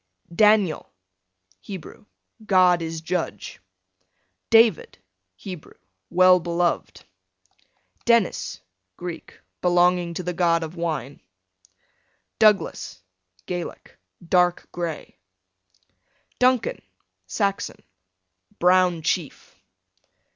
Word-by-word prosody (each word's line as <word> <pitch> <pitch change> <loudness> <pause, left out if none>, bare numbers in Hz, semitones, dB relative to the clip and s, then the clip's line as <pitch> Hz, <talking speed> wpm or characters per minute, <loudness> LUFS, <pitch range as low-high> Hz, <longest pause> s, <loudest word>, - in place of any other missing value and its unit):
D - - -15
Daniel, 210 -4 +3 0.7
Hebrew, 190 - -10 0.4
God 185 -4 +4
is 165 -1 -5
judge. 165 - -4 0.9
David, 225 - +4 0.4
Hebrew, 180 - -10 0.3
well 185 +1 +5
beloved. 175 0 -2 1.0
Denis, 235 -5 +1 0.4
Greek, 175 -2 -8 0.2
belonging 175 -1 +2
to 180 - -4
the 180 +1 -3
god 170 -1 +2
of 160 +2 -7
wine. 150 -6 -4 1.2
Douglas, 210 - +2 0.4
Gaelic, 175 -1 -7 0.3
dark 180 0 +2
gray. 170 - -6 1.2
Duncan, 255 - +2 0.5
Saxon, 200 -2 -2 0.7
brown 180 -2 +3
chief. 165 -3 -3
180 Hz, 75 wpm, -23 LUFS, 170-190 Hz, 1.2 s, well